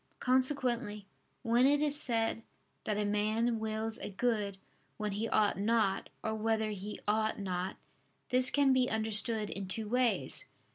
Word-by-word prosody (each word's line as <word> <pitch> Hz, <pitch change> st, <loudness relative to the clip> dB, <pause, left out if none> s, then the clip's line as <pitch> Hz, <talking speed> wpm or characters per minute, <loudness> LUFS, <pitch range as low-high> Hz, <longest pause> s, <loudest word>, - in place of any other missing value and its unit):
Consequently 250 Hz, -5 st, +1 dB, 0.4 s
when 240 Hz, +2 st, +4 dB
it 290 Hz, +1 st, +3 dB
is 295 Hz, 0 st, +3 dB
said 225 Hz, -2 st, 0 dB, 0.4 s
that 210 Hz, -1 st, -1 dB
a 210 Hz, -, 0 dB
man 215 Hz, +3 st, 0 dB
wills 220 Hz, 0 st, -2 dB
a -, -, -5 dB
good 205 Hz, -2 st, -1 dB, 0.4 s
when 210 Hz, -1 st, -2 dB
he 215 Hz, +3 st, -2 dB
ought 205 Hz, -3 st, +2 dB
not, 215 Hz, -2 st, +1 dB
or 220 Hz, -, -1 dB
where 220 Hz, 0 st, 0 dB
he 205 Hz, +1 st, -6 dB
ought 215 Hz, +1 st, +1 dB
not, 185 Hz, -2 st, -3 dB, 0.5 s
this 255 Hz, +1 st, +4 dB
can 280 Hz, -2 st, +3 dB
be 255 Hz, -1 st, +2 dB
understood 220 Hz, 0 st, +1 dB
in 195 Hz, -1 st, -5 dB
two 215 Hz, +4 st, -2 dB
ways. 245 Hz, +2 st, 0 dB
220 Hz, 150 wpm, -32 LUFS, 210-245 Hz, 0.5 s, when